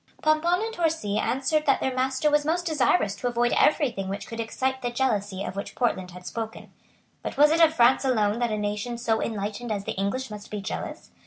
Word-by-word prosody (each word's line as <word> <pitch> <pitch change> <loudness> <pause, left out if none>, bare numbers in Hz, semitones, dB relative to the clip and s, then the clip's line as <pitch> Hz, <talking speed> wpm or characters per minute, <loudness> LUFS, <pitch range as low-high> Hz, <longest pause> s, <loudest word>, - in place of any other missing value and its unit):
Pomponne 335 +5 +3
and 450 - -5
Torcy 320 - 0
answered 270 +7 0
that 275 - +4
their 265 - -1
master 260 +3 +1
was 295 0 +3
most 340 +4 0
desirous 295 - +2
to 245 - -2
avoid 240 0 +1
every 295 -3 +3
thing 195 -4 -5
which 200 +1 -4
could 230 - -8
excite 260 +3 -2
the 245 - -1
jealousy 205 -6 -1
of - - -5
which 200 - -6
Portland 190 -7 0
had 180 0 -12
spoken. 225 +2 -6 0.5
But - - -5
was 295 +1 +6
it 330 +1 +3
of 320 -1 +5
France 245 +1 +5
alone 220 -4 +1
that 240 -1 +1
a 215 - -1
nation 210 +3 -3
so 230 -2 0
enlightened 215 +2 -3
as 200 -2 -2
the - - -3
English 200 +6 -2
must 210 0 -8
be 210 - -4
jealous? 195 - -6
240 Hz, 220 wpm, -26 LUFS, 210-290 Hz, 0.5 s, was